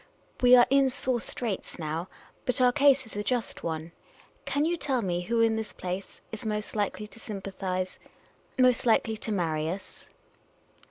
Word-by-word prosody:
" - - -24
We 250 0 +8
are 245 -1 +8
in 275 -1 +5
sore 255 -2 -1
straits 225 -4 -4
now, 160 +3 -3 0.4
but 250 - +2
our 250 -1 +5
case 275 -1 +4
is 225 - -12
a 205 - -1
just 240 +1 -2
one. 160 0 -4 0.5
Can 285 +2 +1
you 340 +2 +1
tell 270 -7 0
me 175 -2 -1
who 230 +5 +1
in 225 -1 +4
this 220 -1 -4
place 185 +2 -6
is 220 - -6
most 210 -1 -2
likely 210 0 -1
to 220 +2 -14
sympathise 190 -3 -4 0.3
— - - -35
most 255 -1 +4
likely 225 0 +3
to 215 - -3
marry 160 -5 0
us 190 +3 -7
220 Hz, 180 wpm, -28 LUFS, 185-250 Hz, 0.5 s, We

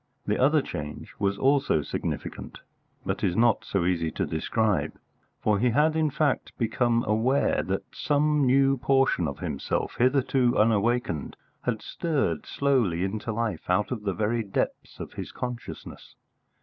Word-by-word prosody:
The - - 0
other 145 +2 +4
change 75 -1 -7
was 100 -1 0
also 135 - +2
significant, - - -5 0.4
but - - -2
is 90 - +1
not 115 0 +3
so 95 -3 -1
easy 85 -2 +1
to - - -1
describe, 85 -1 0 0.5
for 105 -2 +1
he 125 +3 +3
had 150 +6 +3
in 160 -1 +2
fact 145 0 -1
become 120 0 +1
aware 115 +6 +2
that - - -2
some 150 0 +1
new 135 +1 +4
portion 135 -9 +2
of 70 - -5
himself, - - -3
hitherto 130 -1 +2
unawakened, 110 - +1 0.3
had 115 -3 -1
stirred 145 - -1
slowly 120 -12 +1
into 105 +4 -3
life 110 -7 -3
out 95 +6 +1
of 120 -4 -3
the 100 -2 -1
very 110 +4 0
depths 100 -3 -3
of - - -7
his - - -6
consciousness. 125 -1 -7
115 Hz, 150 wpm, -26 LUFS, 100-135 Hz, 0.5 s, other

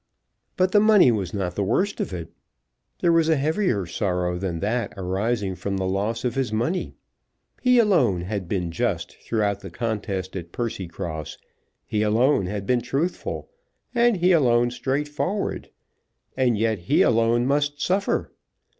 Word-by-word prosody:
But 185 0 +2
the 205 - +6
money 210 - +6
was 100 -6 -2
not 95 -3 -2
the 100 - -1
worst 185 - 0
of - - -2
it. 85 -3 -6 0.7
There 170 - +4
was 165 -1 +3
a 160 - +5
heavier 150 - 0
sorrow 90 0 -1
than 90 -3 -3
that 115 +4 -1
arising 95 +2 -1
from 100 +1 -3
the 95 - -1
loss 105 +5 -1
of 120 - 0
his 135 -3 -1
money. 120 +12 -1 0.7
He 250 -1 +4
alone 160 - +3
had 95 0 -4
been 90 -3 -2
just 80 - -2
throughout 105 -3 0
the 95 - -9
contest 100 -2 -3
at 85 -2 -6
Percycross; 85 - -5 0.5
he 105 -1 -1
alone 110 0 +3
had 100 +1 -4
been 125 +3 +2
truthful, 140 - -3 0.4
and 240 -3 +3
he 180 +1 +3
alone 120 -7 +4
straightforward! 145 - -2 0.7
And 125 -4 +2
yet 110 -1 +1
he 85 - +3
alone 115 +1 +3
must 145 +1 0
suffer! 190 +7 0
115 Hz, 155 wpm, -24 LUFS, 95-145 Hz, 0.7 s, the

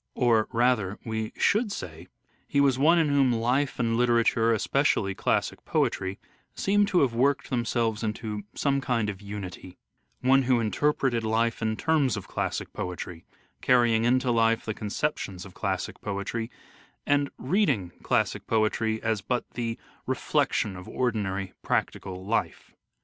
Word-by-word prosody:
Or, 115 -3 +3
rather, 115 -5 +1
we 110 -1 -3
should 215 +1 +2
say 85 - -7 0.4
he 140 - +1
was 135 -2 +3
one 165 +5 +5
in 160 -3 +3
whom 140 -3 +3
life 125 +4 +1
and 115 -2 +1
literature, 115 -1 +3
especially 110 -3 +1
classic - - -1
poetry, 95 +1 0 0.4
seem 205 +1 +2
to 185 -3 +3
have 130 -4 +2
worked 140 +4 +1
them 120 -2 0
selves 115 -2 0
into 105 -1 -3
some 140 -1 +1
kind 115 -5 0
of 100 0 -12
unity: 100 -3 -8 0.4
one 135 +1 +5
who 125 -2 +2
interpreted 120 +1 +1
life 115 +1 0
in 110 -1 0
terms 150 -6 +2
of - - -7
classic - - -3
poetry, 90 -2 -6 0.4
carrying 120 -3 +4
into 125 +1 +2
life 115 -1 +2
the 110 - -2
con 105 - -6
ceptions 100 -9 -2
of 95 - -12
classic - - -3
poetry, 105 +3 -3 0.6
and 145 -1 +2
reading 135 - +1
classic - - 0
poetry 110 0 +1
as 110 -2 0
but 120 +5 -2
the 115 -1 -3 0.3
reflection 100 -3 0
of 90 0 -9
ordinary 100 -6 -1
practical 95 0 -2
life. 115 +3 -2
115 Hz, 150 wpm, -27 LUFS, 105-130 Hz, 0.6 s, one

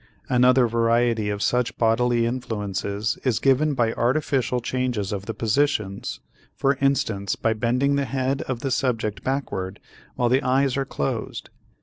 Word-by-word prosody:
Another 125 0 +5
variety 115 -1 +1
of 105 0 -2
such 125 -1 0
bodily 120 +1 +2
influences 105 -3 -2
is 125 -4 +1
given 140 +2 +2
by 115 -3 +1
artificial 130 -1 0
changes 125 -5 -2
of 100 0 -5
the 115 - -2
positions, 110 -4 -1 0.3
for 135 0 +2
instance 110 -8 +1
by 110 - 0
bending 125 +5 +1
the 140 - 0
head 135 +1 -1
of 125 -3 -3
the 135 - -2
subject 110 -7 -1
backward 100 -8 -3 0.4
while 120 - +1
the 130 +3 +3
eyes 135 0 +2
are 135 0 -1
closed. 70 - -4
120 Hz, 145 wpm, -24 LUFS, 110-135 Hz, 0.4 s, Another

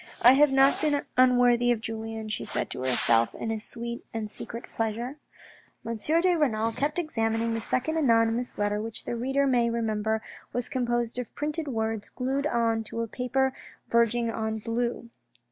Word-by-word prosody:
" - - -22
I - - +8
have 290 +1 +5
not 270 +1 +4
been 295 -2 +1
unworthy 245 -1 +5
of 235 - +1
Julien," 225 0 -5
she 215 - -3
said - - -3
to - - -5
herself 120 -3 +2
with 225 - -3
a 220 - -2
sweet 235 +2 -6
and 215 -2 -4
secret 230 +2 -7
pleasure. 230 +5 -3 0.7
M. 230 - -2
de 335 - +2
Renal 230 -8 +1
kept 290 +7 -1
examining 225 -8 0
the 225 - -2
second 260 +8 -1
anonymous 230 -3 +2
letter 205 0 0
which 225 0 -6
the - - -2
reader 270 +4 +1
may 245 -3 +3
remember 220 -1 -1 0.3
was 245 -1 -1
composed 240 -2 -1
of 245 - -7
printed 300 +1 -2
words 220 -4 -2
glued 270 +3 -1
on 230 -3 +1
to 230 +2 -4
a - - -4
paper 260 +3 0 0.4
verging 235 0 +2
on 220 0 -2
blue. 235 +1 -3
235 Hz, 175 wpm, -27 LUFS, 225-260 Hz, 0.7 s, I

